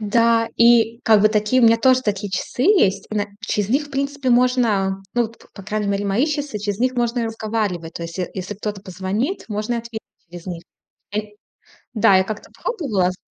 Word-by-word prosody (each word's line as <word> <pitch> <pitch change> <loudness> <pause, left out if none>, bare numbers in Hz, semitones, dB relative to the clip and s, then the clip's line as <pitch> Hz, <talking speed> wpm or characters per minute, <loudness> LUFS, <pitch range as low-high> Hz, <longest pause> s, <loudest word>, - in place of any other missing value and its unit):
Да. 230 +2 +2
И 235 0 +4
как 215 -3 +5
бы 215 - +6
такие 215 +4 +2
у - - +7
меня 230 0 +6
тоже 255 +1 +4
такие 205 -3 -2
часы 190 +6 -3
есть. 205 - +3
И 215 - -4
на 205 -1 0
через 210 -2 -1
них, 275 +6 +1
в 290 - -18
принципе, 275 -1 -2
можно, 230 -6 +2
ну, 240 - +3
вот 230 0 -6
по - - -20
по 200 - -10
крайней 210 +1 -2
мере, 200 0 -1
мои 200 +8 +1
часы, 290 -6 -3
через 205 -1 -3
них 255 +2 +1
можно 240 0 0
и - - -1
разговаривать. 215 -7 -3
То 170 - -6
есть 170 +2 -7
е 180 - -2
если 190 +2 -5
кто-то 210 0 -5
позвонит, 195 - -3
можно 215 +2 -2
и - - 0
ответить 230 -1 -7 0.3
через 175 +1 -11
них. 175 -2 -6 0.5
Ай 210 0 -4 0.6
Да, 200 -3 +5
я 190 - +3
как-то 215 +1 -7
пробовала 245 - 0
з 180 - -13
215 Hz, 215 wpm, -21 LUFS, 200-240 Hz, 0.6 s, у